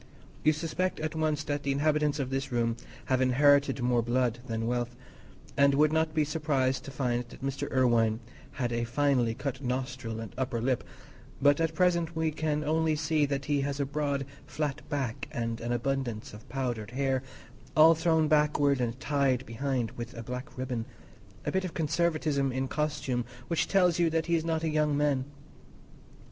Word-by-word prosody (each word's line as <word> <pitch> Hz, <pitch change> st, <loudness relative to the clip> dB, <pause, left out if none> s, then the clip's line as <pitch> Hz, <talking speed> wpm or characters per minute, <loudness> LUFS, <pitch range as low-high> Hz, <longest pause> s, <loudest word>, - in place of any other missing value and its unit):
You 155 Hz, -, +6 dB
suspect 165 Hz, +4 st, -2 dB
at 155 Hz, +1 st, -2 dB
once 155 Hz, -1 st, 0 dB
that 145 Hz, -1 st, -2 dB
the 140 Hz, -, -1 dB
inhabitants 150 Hz, +1 st, +2 dB
of 135 Hz, -3 st, -3 dB
this 135 Hz, 0 st, -2 dB
room 115 Hz, -1 st, +1 dB, 0.3 s
have 130 Hz, -1 st, +1 dB
inherited 140 Hz, 0 st, +4 dB
more 120 Hz, -1 st, +3 dB
blood 120 Hz, 0 st, 0 dB
than 115 Hz, 0 st, -2 dB
wealth, 120 Hz, 0 st, -1 dB, 0.6 s
and 140 Hz, 0 st, +5 dB
would 150 Hz, +2 st, +4 dB
not 160 Hz, 0 st, +1 dB
be 155 Hz, -, +4 dB
surprised 145 Hz, -4 st, 0 dB
to -, -, -6 dB
find 125 Hz, -3 st, -1 dB
that -, -, -12 dB
Mr. 135 Hz, 0 st, -3 dB
Irwine 115 Hz, -4 st, +3 dB, 0.3 s
had 125 Hz, -4 st, -2 dB
a 115 Hz, 0 st, 0 dB
finely 125 Hz, -2 st, +1 dB
cut 140 Hz, 0 st, -4 dB
nostril 125 Hz, -3 st, -3 dB
and 110 Hz, -4 st, -7 dB
upper 130 Hz, -2 st, -1 dB
lip; 125 Hz, +1 st, 0 dB, 0.6 s
but 145 Hz, +3 st, +4 dB
at 160 Hz, 0 st, 0 dB
present 170 Hz, -2 st, +2 dB
we 160 Hz, -1 st, +1 dB
can 150 Hz, -1 st, -1 dB
only 160 Hz, +1 st, +1 dB
see 150 Hz, -1 st, +1 dB
that 140 Hz, 0 st, -2 dB
he 145 Hz, -2 st, +1 dB
has 140 Hz, 0 st, -2 dB
a 140 Hz, -, +1 dB
broad 140 Hz, -1 st, -1 dB, 0.2 s
flat 150 Hz, -1 st, -2 dB
back 135 Hz, -6 st, -2 dB
and 115 Hz, -1 st, -3 dB
an 120 Hz, +1 st, -3 dB
abundance 120 Hz, -3 st, -2 dB
of 105 Hz, -, -12 dB
powdered 120 Hz, -6 st, -3 dB
hair, 135 Hz, +1 st, 0 dB, 0.6 s
all 160 Hz, +2 st, +9 dB
thrown 160 Hz, -1 st, +2 dB
backward 150 Hz, -2 st, +3 dB
and 120 Hz, +1 st, -2 dB
tied 135 Hz, -3 st, +1 dB
behind 125 Hz, 0 st, -2 dB
with 120 Hz, +1 st, -7 dB
a 115 Hz, -, -6 dB
black 125 Hz, +4 st, -7 dB
ribbon—a 115 Hz, -5 st, -6 dB
bit 190 Hz, 0 st, 0 dB
of 185 Hz, -, -5 dB
conservatism 155 Hz, -4 st, +1 dB
in 130 Hz, +1 st, -1 dB
costume 140 Hz, -4 st, -1 dB, 0.3 s
which 170 Hz, -, +1 dB
tells 180 Hz, -3 st, +3 dB
you 170 Hz, -1 st, +4 dB
that 160 Hz, 0 st, 0 dB
he 170 Hz, -, -1 dB
is 160 Hz, -, 0 dB
not 165 Hz, -1 st, -1 dB
a -, -, +1 dB
young 150 Hz, -1 st, +1 dB
man. 145 Hz, -3 st, +1 dB
140 Hz, 180 wpm, -29 LUFS, 125-155 Hz, 0.6 s, all